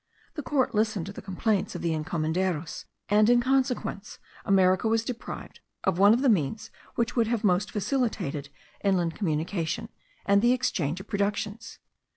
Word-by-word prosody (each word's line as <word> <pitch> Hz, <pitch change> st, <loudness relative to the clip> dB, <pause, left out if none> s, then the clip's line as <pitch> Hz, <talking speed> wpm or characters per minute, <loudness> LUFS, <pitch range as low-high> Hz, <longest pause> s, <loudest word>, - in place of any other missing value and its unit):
The 315 Hz, -, -4 dB
court 275 Hz, -1 st, 0 dB
listened 210 Hz, -4 st, 0 dB
to 200 Hz, -, -7 dB
the -, -, -8 dB
complaints 195 Hz, 0 st, -1 dB
of 175 Hz, -, -5 dB
the 165 Hz, -1 st, +1 dB
encomenderos; 160 Hz, +1 st, -2 dB, 0.2 s
and 210 Hz, +1 st, +4 dB
in 245 Hz, 0 st, +6 dB
consequence 255 Hz, -5 st, -1 dB, 0.3 s
America 190 Hz, 0 st, +3 dB
was 225 Hz, 0 st, +1 dB
deprived 240 Hz, -1 st, -7 dB, 0.2 s
of 170 Hz, -, +1 dB
one 200 Hz, +1 st, +7 dB
of 240 Hz, +4 st, +3 dB
the -, -, +4 dB
means 205 Hz, -, +1 dB, 0.2 s
which 235 Hz, +1 st, -1 dB
would 230 Hz, -3 st, +3 dB
have 230 Hz, -1 st, -1 dB
most 195 Hz, 0 st, +2 dB
facilitated 200 Hz, -, -2 dB, 0.3 s
inland 180 Hz, -4 st, +2 dB
communication, 170 Hz, +4 st, -2 dB, 0.4 s
and 200 Hz, 0 st, +4 dB
the 240 Hz, +2 st, +5 dB
exchange 180 Hz, -, -1 dB
of 200 Hz, -, -14 dB
productions. 205 Hz, +2 st, -2 dB
200 Hz, 160 wpm, -27 LUFS, 180-225 Hz, 0.4 s, one